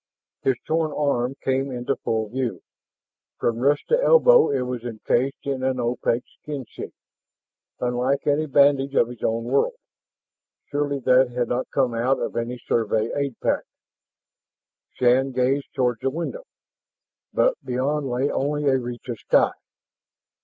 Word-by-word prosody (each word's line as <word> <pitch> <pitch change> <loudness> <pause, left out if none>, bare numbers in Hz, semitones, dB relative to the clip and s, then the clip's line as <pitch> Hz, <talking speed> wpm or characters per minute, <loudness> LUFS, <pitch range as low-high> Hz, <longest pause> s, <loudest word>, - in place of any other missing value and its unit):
His 135 - +2
torn 160 -1 0
arm 135 -3 0
came 135 +1 0
into 125 +2 -2
full 110 -1 -2
view. 125 0 -3 0.7
From 115 0 -1
wrist 145 +3 +2
to 485 +1 +3
elbow - - +6
it 135 -2 0
was 125 -2 -4
encased 120 +3 -1
in 135 -2 -2
an 130 -1 0
opaque 120 0 0 0.2
skin 145 -4 -5
sheath, - - -8 0.9
unlike 125 +3 0
any 150 +2 +1
bandage 140 0 +3
of 120 - +3
his 120 -2 -10
own 115 +1 0
world. 135 - +1 1.0
Surely 145 -1 0
that 130 +1 +4
had 120 -1 -2
not 125 +1 -2
come 130 -3 +1
out 125 +4 +1
of - - -3
any 120 +1 -2
Survey 110 -1 0
aid 140 -4 -2
pack. - - +1 1.3
Shann 130 +2 +3
gazed 130 +3 0
toward 125 -3 +1
the 135 - +1
window, 170 - -5 0.9
but - - +2
beyond 135 +3 -1
lay 125 +3 0
only 145 +2 -1
a 135 -2 +3
reach 120 +1 -7
of 120 -3 -5
sky. - - +3
130 Hz, 145 wpm, -23 LUFS, 120-140 Hz, 1.3 s, elbow